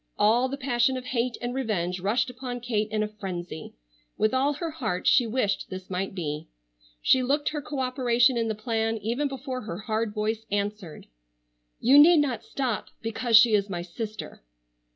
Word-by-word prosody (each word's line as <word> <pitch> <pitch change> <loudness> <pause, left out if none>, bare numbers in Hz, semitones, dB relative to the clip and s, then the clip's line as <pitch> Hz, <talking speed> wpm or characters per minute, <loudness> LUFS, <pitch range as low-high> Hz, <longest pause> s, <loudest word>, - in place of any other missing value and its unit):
All 240 +5 +3
the 275 - -4
passion 250 -1 +1
of 255 - -7
hate 245 -1 -1
and 245 0 -2
revenge 190 -9 -1
rushed 230 +7 0
upon 250 0 -6
Kate 215 -3 -1
in 215 0 0
a - - -1
frenzy. 180 -6 -7 0.4
With 215 - +2
all 270 +3 +2
her 325 +3 -4
heart 220 - -3
she 245 - +5
wished 215 -4 -1
this 185 0 -8
might 190 +1 -3
be. 150 -4 -4 0.6
She 260 - +5
looked 285 +4 +1
her 300 -1 -4
co 285 +1 -6
operation 255 -1 +2
in 230 -1 0
the 220 - -2
plan 225 0 -1
even 235 +7 -1
before 265 -1 -5
her 175 -5 -6
hard 215 +1 -2
voice 215 +1 -2
answered: 205 -4 -3 0.7
"You 270 +5 +6
need 335 +3 +8
not 260 -7 0
stop 250 -7 -3 0.2
because 225 0 +3
she 220 +1 +6
is 205 -1 +2
my 175 -2 -3
sister." 215 +5 -7
225 Hz, 180 wpm, -26 LUFS, 210-255 Hz, 0.7 s, need